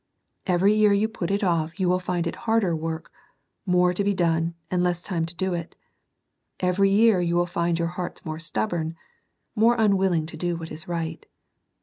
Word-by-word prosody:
Every 190 +3 +4
year 215 -1 +4
you 205 +2 +2
put 220 -6 -4
it 200 +1 0
off 170 -1 0
you 185 - +1
will 180 +1 +2
find 180 -1 -2
it 170 - -3
harder 215 -7 +2
work, 160 0 -5 0.3
— - - -51
more 180 0 +3
to 200 - 0
be 200 0 +1
done, 165 -1 +1 0.2
and 180 -1 +1
less 175 -1 0
time 165 -4 -2
to 170 - -9
do 190 +1 -1
it. 170 -1 -5 0.8
Every 185 +2 +2
year 205 -1 +4
you 170 0 0
will 175 0 +3
find 170 -1 -1
your 170 0 -1
hearts 180 0 -6
more 155 0 -4
stubborn, 160 +3 -2 0.3
— - - -50
more 230 +2 +4
unwilling 190 -7 +2
to 160 - -8
do 175 -1 -1
what 165 -1 -7
is 155 +1 -7
right. 165 -2 -4
175 Hz, 205 wpm, -25 LUFS, 165-195 Hz, 0.8 s, Every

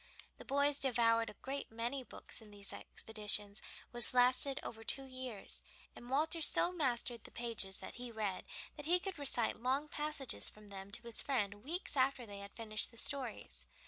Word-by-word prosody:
The - - -9
boys 285 +1 +3
devoured 230 -3 +4
a - - -10
great 275 -1 -3
many 235 +4 -1
books 245 - -6
in 215 - -13
these 200 -1 -2
expeditions, 210 -1 -2 0.3
which 240 +1 +6
lasted 255 +2 +5
over 225 -1 -6
two 270 - -1
years, 255 -5 -5 0.3
and 240 - -10
Walter 315 +5 +2
so 345 +3 +5
mastered 245 -8 0
the - - -10
pages 225 -5 -2
that - - -7
he 245 -1 -4
read 210 -4 -2 0.3
that 295 0 -6
he 355 +2 +6
could 375 -3 -5
recite 245 -5 +3
long 265 +4 +2
passages 295 -5 0
from 210 -1 -14
them 195 0 -7
to 235 - -2
his 235 -1 +3
friend 205 -6 0
weeks 340 +5 -3
after 260 -2 +3
they 200 -2 -8
had 200 0 -9
finished 215 -2 0
the 230 - -12
stories. 225 - 0
240 Hz, 180 wpm, -37 LUFS, 215-275 Hz, 0.3 s, which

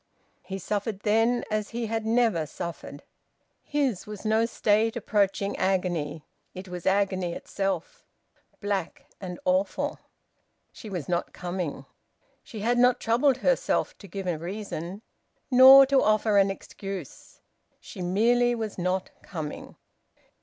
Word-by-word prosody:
He 190 +1 -6
suffered 205 +1 -3
then 225 +3 +2
as 215 -1 -1
he 235 0 -3
had 225 0 -2
never 225 -9 +2
suffered. 165 -3 -7 0.6
His 275 -11 -1
was 210 0 -8
no 220 +1 +2
state 220 0 +1
approaching 200 -3 0
agony; 175 -5 -1 0.3
it 185 +1 -8
was 180 -1 -6
agony 190 -3 +1
itself, 200 - -4 0.5
black 200 -4 -3
and 180 -3 -7
awful. 280 +1 0 0.7
She 215 - -10
was 180 -7 -5
not 175 -1 -2
coming. 175 -6 -4 0.6
She 215 - -9
had 240 +3 +1
not 250 0 +4
troubled 250 +4 +2
herself - - +1
to 200 - -12
give 195 +1 -6
a 175 -4 -1
reason, 190 +1 -6 0.5
nor 265 +2 +10
to 270 0 +3
offer 215 -1 +3
an 195 0 +4
excuse. 195 -3 -8 0.4
She - - -10
merely 240 +7 +2
was 220 -4 -5
not 185 +1 -1
coming. 155 -5 -7
205 Hz, 130 wpm, -27 LUFS, 180-230 Hz, 0.7 s, nor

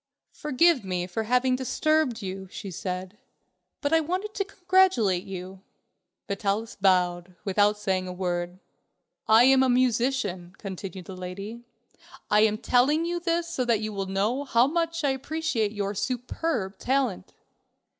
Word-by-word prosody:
"Forgive 300 -1 +2
me 180 -2 -2
for 200 +5 -3
having 250 +2 +2
disturbed 260 -2 0
you," 190 0 -5
she 195 +1 -7
said, 185 +3 -5 0.6
"but 285 +1 0
I 325 - +6
wanted 370 +7 -3
to 395 - -1
congratulate 365 - +2
you." 190 0 -8 0.7
Vitalis 205 +2 -2
bowed, 180 -2 +1
without 205 +1 +3
saying 190 -3 -1
a - - -4
word. 180 -1 -3 0.7
"I 220 +2 +7
am 265 +1 +6
a 260 - +3
musician," 240 -7 0
continued 190 -2 -7
the 190 - -8
lady; 195 +6 -7 0.7
"I 210 - +5
am 215 0 +3
telling 265 +8 +2
you 345 0 -2
this 340 0 0
so 335 -7 -2
that 235 -3 +2
you 215 0 -3
will 195 -1 -3
know 210 +8 0
how 240 -3 +3
much 330 +2 -1
I 280 - +3
appreciate 265 -5 -1
your 205 -1 -2
superb 240 -1 -2
talent." 255 -8 -1
220 Hz, 145 wpm, -26 LUFS, 190-275 Hz, 0.7 s, I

